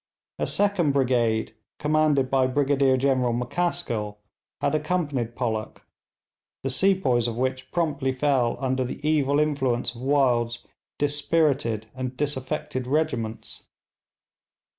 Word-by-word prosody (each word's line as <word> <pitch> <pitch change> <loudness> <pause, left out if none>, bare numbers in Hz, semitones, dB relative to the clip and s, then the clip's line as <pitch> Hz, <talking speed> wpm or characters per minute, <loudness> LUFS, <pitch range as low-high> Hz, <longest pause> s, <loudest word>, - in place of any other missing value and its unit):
A - - 0
second 200 -8 +2
brigade 120 -5 +1 0.2
commanded 150 -3 +2
by 130 -1 +3
Brigadier 135 0 +2
General 130 -3 +1
McCaskill, 120 -5 -2 0.4
had 140 - 0
accompanied 150 -7 -1
Pollock, 110 -4 -3 0.8
the 135 - 0
sepoys 135 - +2
of 115 -1 -4
which 130 +1 -2
promptly 145 -6 0
fell 130 -3 +1
under 130 -1 0
the 135 +4 -5
evil 145 -2 +2
influence 130 -5 0
of 120 - -11
Wild's 125 -4 +1 0.3
dispirited 145 -6 +1
and 130 -1 -5
disaffected 130 -2 -2
regiments. 130 -7 -2
130 Hz, 110 wpm, -25 LUFS, 120-145 Hz, 0.8 s, by